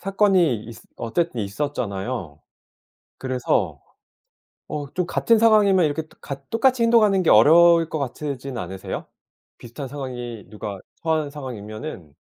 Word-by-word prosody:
사건이 190 - +2
있으 115 0 -11
어쨌든 125 +2 -2
있었잖아요. 100 - -4 0.8
그래서 130 -1 -1 0.9
어 145 -1 -4
좀 180 -1 -1
같은 230 +5 +2
상황이면 210 -5 +5
이렇게 155 +2 -1 0.2
같 140 -1 -8
똑같이 250 +1 +2
행동하는 215 -5 +4
게 - - +2
어려울 165 +7 +6
것 155 - -3
같지는 135 -1 -4
않으세요? 95 0 -5 0.5
비슷한 125 +4 -8
상황이 125 -5 -6
누가 105 -2 -6 0.2
처한 160 -3 0
상황이면은. 110 - -8
140 Hz, 305 characters per minute, -23 LUFS, 115-170 Hz, 0.9 s, 어려울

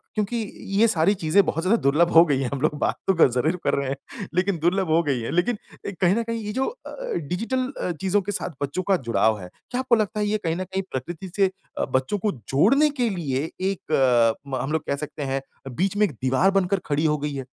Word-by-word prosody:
क्योंकि 215 +2 -1 0.4
ये 230 - +6
सारी 190 -1 +3
चीज़ें 175 +6 +5
बहुत 165 - -1
ज़्यादा 215 +5 +2
दुर्लभ 160 +5 +3
हो 165 +1 +9
गई 140 -5 +1
हैं, 130 - -1
हम 135 - -3
लोग 155 - +2
बात - - +1
तो 190 - +5
ग 165 - +6
ज़रूर 140 +8 +1
कर - - +1
रहे 140 -1 -1
हैं, 140 +7 -7
लेकिन 185 0 +1
दुर्लभ 180 +3 +1
हो 160 +2 +4
गई 135 -5 -1
हैं। 115 - -4
लेकिन 175 +7 +1 0.3
एक 195 - -10
कहीं 185 +1 +4
न 230 - 0
कहीं 230 -1 -4
ये 210 - -3
जो 265 +3 0
अ - - -8
अ, - - -9 0.2
जो - - 0
डिजिटल 230 - -1 0.2
अ, 180 - -1
चीज़ों 195 +1 +2
के 200 +2 -4
साथ 190 - -3
बच्चों 145 +7 -2
का 190 - +5
जुड़ाव 110 -1 +2
है, 90 -2 -9 0.2
क्या 250 - -1
आपको 255 -2 +3
लगता 215 -1 -1
है 210 - +1
ये 215 +1 +1
कहीं 165 -1 0
न 185 - -3
कहीं 190 +1 -3
प्रकृति 170 +8 -5
से 195 -2 +3 0.3
अ, - - 0
बच्चों 130 +10 +1
को 210 +2 0
जोड़ने 190 - +3
के 235 - +3
लिए 155 -5 -2 0.2
एक 125 -10 +2
म 135 - -2
हम 135 - -3
लोग 160 0 0
कह 140 - +1
सकते 150 0 -7
हैं, 135 0 -1 0.3
बीच 195 +5 0
में 210 - +5
एक 185 - -3
दीवार 130 +9 +3
बनकर 195 0 +1
खड़ी 150 +2 0
हो 150 -1 +2
गई 145 0 -3
है? 135 - -5
175 Hz, 255 wpm, -24 LUFS, 140-200 Hz, 0.4 s, हो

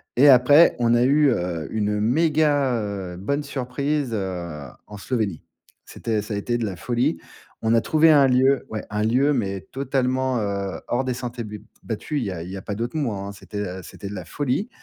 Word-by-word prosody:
et 145 +4 +7
après, 140 +5 +7
on 120 -1 +3
a 120 - +4
eu 145 +3 +4
heu, 85 -8 -2
une 105 -1 0
méga, 145 +2 +2
heu, 95 -4 -5
bonne 140 +10 -2
surprise 140 0 -2
heu, 90 -6 -4 0.3
en 105 - -10
Slovénie. 105 -5 -2 0.4
C'était 110 -3 -2
ça 105 +1 -6
a - - -1
été 120 +4 -1
de 120 - -2
la 95 -4 -4
folie. 120 - 0 0.4
On 110 0 +2
a 115 - +4
trouvé 160 +4 +4
un 140 -3 +6
lieu, 130 +2 +3
ouais 110 -1 -4
un 105 0 -1
lieu, 130 +6 +3
mais 100 -7 -2
totalement, 130 -1 0
heu, 100 -2 -3
hors 125 +2 0
des 130 - -1
sentiers 120 -1 -5
bu 105 -1 -8 0.2
battus. 135 +6 -3
Il - - -2
y 100 - -2
a 85 -3 -5
il 90 - -8
y 95 - -6
a - - -7
pas 100 - -5
d'autres 120 +8 -3
mots, 140 -7 0
hein. 100 0 -5
C'était, 105 +1 -8
heu, 95 -2 -4
c'était 100 - -9
de 100 - -6
la 95 - -6
folie. 145 - -2
120 Hz, 215 wpm, -23 LUFS, 100-135 Hz, 0.4 s, et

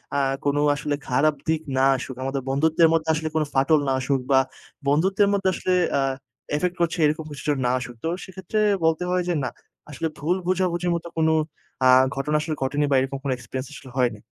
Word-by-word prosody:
আ - - +2 0.3
কোনো 145 +1 +2 0.2
আসলে 150 0 -2
খারাপ 145 +4 +2
দিক 160 -1 +1 0.2
না 130 - +3 0.2
আসুক। 130 0 -6
আমাদের 135 0 -2
বন্ধুত্বের 160 +4 +3
মধ্যে 160 0 0
আসলে 155 0 -2
কোন 155 - +3
ফাটল 140 +3 +4
না - - +2
আসুক 135 +1 0
বা 135 - +6 0.5
বন্ধুত্বের 190 +8 +3
মধ্যে 195 -1 +2
আসলে 185 - -2 0.3
আ - - +2 0.6
ইফেক্ট 180 +3 -1
করছে, 170 +1 +1
এরকম 155 +1 0
কিছু 145 - -8
যেন 145 - +2
না 125 - +2
আসুক। 120 -1 -7
তো - - -1 0.2
সেক্ষেত্রে 190 +3 -4 0.2
বলতে 160 +1 +2
হয় 180 0 +2
যে, 175 - +1
না, 125 - -1 0.4
আসলে 150 +3 -3
ভুল 165 +5 0
বোঝাবুঝির 180 -1 0
মতো 170 0 -5
কোনো 160 0 +3 0.5
আ - - +7 0.3
ঘটনা 145 +3 -1
আসলে 155 -1 -3
ঘটেনি 145 +2 +1
বা - - +4
এরকম 135 +1 -2
কোনো 135 -2 0
এক্সপেরিয়েন্স 130 +2 -6
আসলে 130 -2 -11
হয়নি। 120 -4 +1
150 Hz, 200 wpm, -24 LUFS, 135-170 Hz, 0.6 s, আ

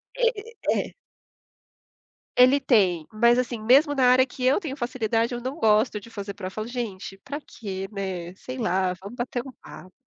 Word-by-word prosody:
E - - +1 0.2
e 470 - -17 0.2
e - - -1
é - - -22 1.4
Ele 255 +3 +6
tem, 185 - +2
mas 235 +3 +4
assim, 240 -3 -2
mesmo 280 +6 +5
na 265 -3 +2
área 255 +1 +6
que 260 0 -8
eu 265 +7 +4
tenho 295 -8 -6
facilidade, 235 -1 -1
eu 240 - -4
não 260 +4 -4
gosto 215 -1 +3
de 220 - -14
fazer 200 -3 -6
prova, 190 -1 -6
eu - - -7
falo: 215 +1 -4
"Gente, 210 -6 -5
para 290 +2 -5
quê, 195 -7 -6
né. 185 -4 -4
Sei 255 +5 -8
lá, 185 -5 +1
vamos 200 +5 -10
bater 245 0 -3
um 265 - -8
papo". 185 0 -12
235 Hz, 195 wpm, -25 LUFS, 195-255 Hz, 1.4 s, Ele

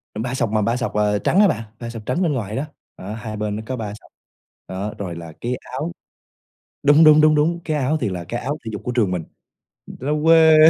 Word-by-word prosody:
Ba 120 +4 -3
sọc 125 -4 0
mà 110 0 +2
ba 115 +4 +1
sọc, 125 - -2
à, 105 -1 +2
trắng 190 - +3
á 210 - +7
bạn, 115 - -1 0.2
ba 120 - -5
sọc 115 -2 -8
trắng 130 +10 0
bên 165 -5 +2
ngoài 110 -5 -3
đó, 135 - -1 0.3
đó, 100 +3 -6
hai 110 -1 -6
bên 105 -1 -2
nó 110 - -5
có 130 - -3
ba 110 -4 -4
sọc. 105 - -15 0.6
Đó, 95 +3 -4
rồi 90 -4 -5
là 85 -1 -8
cái 125 +2 -1 0.2
áo 150 +6 -3 0.9
đúng, 145 +3 +7
đúng, 155 -1 +8
đúng, 155 0 +5
đúng, 165 +3 +2
cái 155 -2 -1
áo 145 +3 +1
thì - - +1
là 90 -2 -4
cái 120 +8 -4
áo 145 +2 -2
thể - - -3
dục 105 - -5
của 125 - -2
trường 115 -6 +1
mình, 90 -3 -2 0.6
nó 135 +4 -4
quê. 160 -1 +7
120 Hz, 245 wpm, -21 LUFS, 105-150 Hz, 0.9 s, đúng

